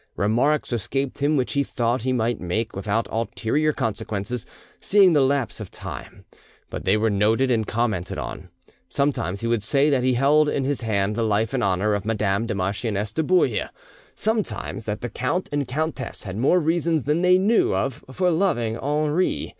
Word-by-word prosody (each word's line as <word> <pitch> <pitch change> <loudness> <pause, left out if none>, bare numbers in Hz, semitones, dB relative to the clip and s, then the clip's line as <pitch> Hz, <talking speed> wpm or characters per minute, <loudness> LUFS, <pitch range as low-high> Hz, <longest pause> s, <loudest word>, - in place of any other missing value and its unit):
Remarks 125 +9 +1
escaped 135 +5 -2
him 145 +2 +2
which 130 - -1
he 140 - +2
thought 120 -2 -1
he 130 +3 -1
might 120 -2 0
make 105 +6 -2
without 100 +4 -1
ulterior 115 +6 0
consequences; 110 -1 -3 0.3
seeing 195 -3 +5
the 145 - +4
lapse 135 -4 0
of 105 - -7
time, - - -9 0.5
but - - -6
they 95 +3 +4
were 110 0 +1
noted 110 +6 +2
and 110 -3 +1
commented 110 -6 -1
on. - - -6 0.4
Sometimes 125 -9 -1
he 115 - -1
would 115 -2 +1
say 140 +7 +2
that 130 -3 +2
he 130 -1 +2
held 145 +4 +4
in 135 - -1
his 140 0 -1
hand 105 -2 0
the 115 - -1
life 110 0 +1
and - - 0
honour 100 +2 +1
of 100 -1 -1
Madame 105 0 0
the 110 - -2
Marchioness 100 +2 -2
de 160 - -1
Bouille; 180 +3 +2 0.5
sometimes 205 - -2
that 105 -1 -3
the 120 - -3
count 150 +12 -2
and 145 -2 -1
countess 145 -2 -3
had 95 -2 -6
more 135 - +3
reasons 165 -2 +1
than 150 +4 +1
they 180 0 +5
knew 200 - +3
of 130 +8 -2
for 180 +5 +1
loving 120 - 0
Henri. 150 +5 0
120 Hz, 185 wpm, -23 LUFS, 105-145 Hz, 0.5 s, seeing